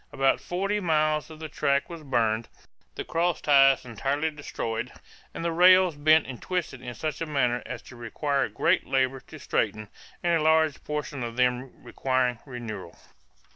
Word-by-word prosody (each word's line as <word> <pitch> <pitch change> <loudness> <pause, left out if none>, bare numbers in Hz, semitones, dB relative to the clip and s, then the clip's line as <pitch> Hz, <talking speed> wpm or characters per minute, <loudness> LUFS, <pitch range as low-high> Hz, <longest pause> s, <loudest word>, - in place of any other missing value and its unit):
About 135 0 +2
forty 195 +4 -1
miles 155 -4 +1
of 160 - -10
the 160 - -5
track 140 -1 0
were 165 -2 -9
burned, 115 -4 0 0.5
the - - -4
cross 170 +1 0
ties 135 -2 +5
entirely 140 +7 -1
destroyed, 130 -6 -4 0.4
and 165 - -6
the 170 - +1
rails 180 0 +6
bent 155 +2 +4
and 125 -3 -8
twisted 175 -8 -3
in 125 -1 -7
such 155 +1 -4
a 165 - -2
manner 125 -5 +1
as 120 -2 -6
to 130 - -13
require 135 +4 -1
great - - +1
labor 135 0 +1
to - - -13
straighten 105 -1 -2 0.3
and 170 -1 +2
a - - -1
large 160 -1 +3
portion 150 -2 -4
of 115 -1 -4
them 125 +1 -1
requiring 130 -2 0
renewal." 120 -4 -7
140 Hz, 170 wpm, -26 LUFS, 125-160 Hz, 0.5 s, rails